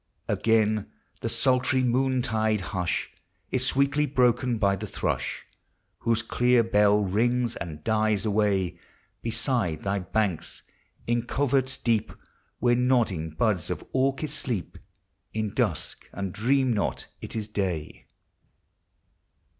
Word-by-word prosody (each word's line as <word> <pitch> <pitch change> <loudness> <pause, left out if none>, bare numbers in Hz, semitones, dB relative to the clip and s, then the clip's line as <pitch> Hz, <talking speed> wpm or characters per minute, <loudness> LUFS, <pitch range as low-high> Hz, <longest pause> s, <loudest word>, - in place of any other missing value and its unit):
Again 110 -2 +2 0.3
the - - -2
sultry 130 0 +3
noontide 120 -4 +1
hush 90 -2 -1 0.4
Is 130 0 +1
sweetly 140 +3 +2
broken 125 -2 +2
by 100 -2 +2
the - - -6
thrush, - - -2 0.5
Whose 115 -1 +1
clear 120 +1 +3
bell 105 -1 +4
rings 120 +5 +1
and 80 -3 -7
dies 110 -1 +1
away 100 -4 +1 0.4
Beside 115 - -1
thy 100 0 0
banks, 95 -1 -2 0.4
in 120 0 0
coverts 135 -1 +1
deep. 110 -2 0 0.5
Where 120 +1 +3
nodding 120 -10 +1
buds 90 +2 0
of - - -3
orchis 135 +3 0
sleep 120 - -3 0.6
In 110 -2 -2
dusk, - - -1
and 100 -2 -4
dream 130 +4 +2
not 105 - -1 0.2
it - - -7
is 110 -2 -3
day. 95 -7 -3
110 Hz, 115 wpm, -26 LUFS, 100-125 Hz, 0.6 s, bell